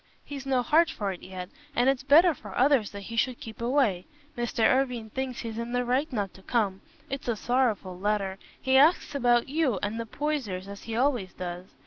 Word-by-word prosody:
He's 275 -2 -7
no 260 -2 +2
heart 320 +6 +4
for 205 -10 -3
it 180 - -8
yet, 185 -1 -7 0.3
and 245 0 +3
it's 270 -1 +2
better 315 +6 +6
for - - -10
others 260 -5 +4
that 200 0 -8
he 230 - -7
should 245 +2 0
keep 225 0 -9
away. 235 -8 +1 0.3
Mr. 240 -1 -1
Irwine 250 -4 0
thinks 260 -1 -3
he's 230 -1 -5
in 235 +1 -4
the 245 0 +1
right 265 +6 0
not 205 -6 -2
to 190 - -15
come. 195 -3 0 0.3
It's 275 -2 -5
a 235 - +1
sorrowful 215 -6 0
letter. 195 -1 -1 0.2
He 265 0 +3
asks 305 +5 +4
about 240 -3 +3
you 280 -6 +1
and 210 +3 -2
the 230 - -4
Poysers, 235 -10 -3
as 200 0 -9
he 225 - -4
always 245 -7 +1
does. 180 0 -6
240 Hz, 205 wpm, -27 LUFS, 205-270 Hz, 0.3 s, better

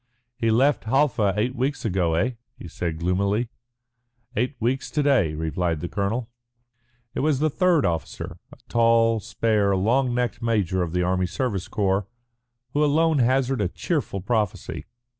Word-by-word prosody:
"He 115 -1 0
left 130 +5 +3
Halfa 115 -6 +2
eight 120 +5 0
weeks 135 +2 -2
ago, 90 -5 +1
eh?" 110 +10 +1 0.3
he - - -9
said 85 0 -4
gloomily. 100 +7 0 0.9
"Eight 125 +6 0
weeks 125 +4 -1
to 150 - 0
day," 120 - +3
replied 80 +1 -1
the 85 - -4
colonel. 105 +6 -2 0.9
It - - -3
was 150 -1 +2
the 155 +2 +1
third 180 -2 +3
officer, 85 -2 -3
a - - -13
tall, 115 -1 +3
spare, 105 -3 +1
long 120 +6 +2
necked 125 -1 -1
major 100 -6 +1
of 85 -2 -2
the 90 0 +1
Army 90 0 +1
Service 100 0 -2
Corps, 100 -1 0 0.7
who 150 - +2
alone 155 +1 +3
hazarded 130 -1 +2
a 90 - -4
cheerful 145 - -2
prophecy. 105 -1 -2
115 Hz, 155 wpm, -24 LUFS, 95-130 Hz, 0.9 s, left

